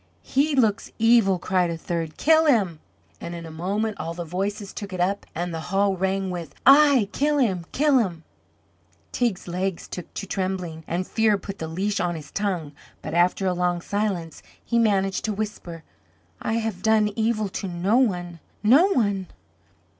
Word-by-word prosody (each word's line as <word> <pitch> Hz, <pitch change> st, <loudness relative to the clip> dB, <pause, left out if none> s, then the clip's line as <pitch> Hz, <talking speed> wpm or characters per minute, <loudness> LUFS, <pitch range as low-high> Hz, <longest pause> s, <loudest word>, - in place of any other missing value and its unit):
"He 285 Hz, +2 st, +1 dB
looks 225 Hz, -4 st, +1 dB
evil," 225 Hz, -4 st, +4 dB
cried 180 Hz, 0 st, +1 dB
a 165 Hz, -, -3 dB
third. 165 Hz, -1 st, -4 dB
"Kill 320 Hz, +1 st, +4 dB
him!" 200 Hz, -, +2 dB, 0.4 s
And 170 Hz, -, -6 dB
in 170 Hz, -1 st, -7 dB
a 160 Hz, -, -9 dB
moment 200 Hz, +6 st, -2 dB
all 165 Hz, +1 st, -4 dB
the 175 Hz, -1 st, -5 dB
voices 195 Hz, +4 st, -3 dB
took 200 Hz, -1 st, -7 dB
it 185 Hz, -, -4 dB
up 195 Hz, +3 st, 0 dB
and 175 Hz, +1 st, -3 dB
the 165 Hz, -, -3 dB
hall 195 Hz, +1 st, +2 dB
rang 190 Hz, +1 st, -1 dB
with: 175 Hz, -2 st, -6 dB
"Aye, 275 Hz, -4 st, +7 dB
kill 295 Hz, +1 st, +1 dB
him, 190 Hz, -, 0 dB
kill 290 Hz, -2 st, +3 dB
him!" 175 Hz, -8 st, -2 dB, 0.9 s
Teig's 235 Hz, -8 st, -1 dB
legs 180 Hz, +1 st, -3 dB
took 180 Hz, -, -8 dB
to 200 Hz, -, -4 dB
trembling, 185 Hz, -4 st, -3 dB
and 180 Hz, +2 st, -2 dB
fear 220 Hz, -1 st, +2 dB
put 195 Hz, 0 st, -8 dB
the 160 Hz, -, -4 dB
leash 195 Hz, +6 st, -1 dB
on 175 Hz, -1 st, -1 dB
his 150 Hz, -3 st, -9 dB
tongue; 185 Hz, -8 st, -2 dB, 0.3 s
but 155 Hz, -, -5 dB
after 175 Hz, +3 st, +2 dB
a 185 Hz, -, +2 dB
long 175 Hz, 0 st, 0 dB
silence 190 Hz, -4 st, -3 dB, 0.2 s
he 235 Hz, -, +1 dB
managed 195 Hz, -4 st, +1 dB
to 215 Hz, -, -1 dB
whisper: 195 Hz, -6 st, -5 dB, 0.6 s
"I -, -, -1 dB
have 225 Hz, -5 st, -2 dB
done 220 Hz, 0 st, +3 dB
evil 220 Hz, -2 st, 0 dB
to 195 Hz, -, -4 dB
no 185 Hz, +6 st, +1 dB
one 175 Hz, -9 st, 0 dB, 0.2 s
no 270 Hz, -, +6 dB
one!" 200 Hz, -6 st, 0 dB
195 Hz, 175 wpm, -24 LUFS, 175-220 Hz, 0.9 s, Aye